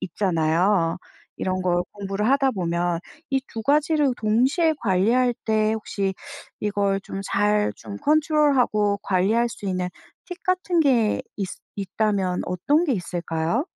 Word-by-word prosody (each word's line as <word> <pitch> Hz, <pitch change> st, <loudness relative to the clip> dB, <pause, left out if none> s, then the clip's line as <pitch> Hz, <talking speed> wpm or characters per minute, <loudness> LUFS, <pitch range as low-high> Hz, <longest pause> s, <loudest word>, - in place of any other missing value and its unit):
있잖아요, 170 Hz, 0 st, +1 dB, 0.4 s
이런 185 Hz, 0 st, -2 dB
걸 175 Hz, -1 st, +1 dB
공부를 200 Hz, +1 st, -2 dB
하다 275 Hz, 0 st, +3 dB
보면. 175 Hz, -4 st, -1 dB, 0.3 s
이 270 Hz, -, +2 dB
두 225 Hz, -, -4 dB
가지를 295 Hz, 0 st, +2 dB
동시에 260 Hz, -, +2 dB
관리할 230 Hz, +6 st, +2 dB
때 215 Hz, -1 st, +2 dB
혹시 200 Hz, -3 st, -2 dB, 0.5 s
이걸 200 Hz, -1 st, 0 dB
좀 195 Hz, 0 st, -6 dB
잘 210 Hz, +1 st, +1 dB
좀 200 Hz, -, -8 dB
컨트롤하고 285 Hz, -9 st, +2 dB
관리할 210 Hz, +6 st, +2 dB
수 205 Hz, -, -8 dB
있는 185 Hz, -1 st, -1 dB, 0.4 s
팁 360 Hz, -, -7 dB
같은 365 Hz, -3 st, +1 dB
게 245 Hz, -7 st, +2 dB
있으 195 Hz, -3 st, -4 dB, 0.2 s
있다면 195 Hz, -2 st, -1 dB
어떤 285 Hz, -, +1 dB
게 285 Hz, -, +1 dB
있을까요? 170 Hz, -, -2 dB
210 Hz, 260 characters per minute, -23 LUFS, 185-265 Hz, 0.5 s, 하다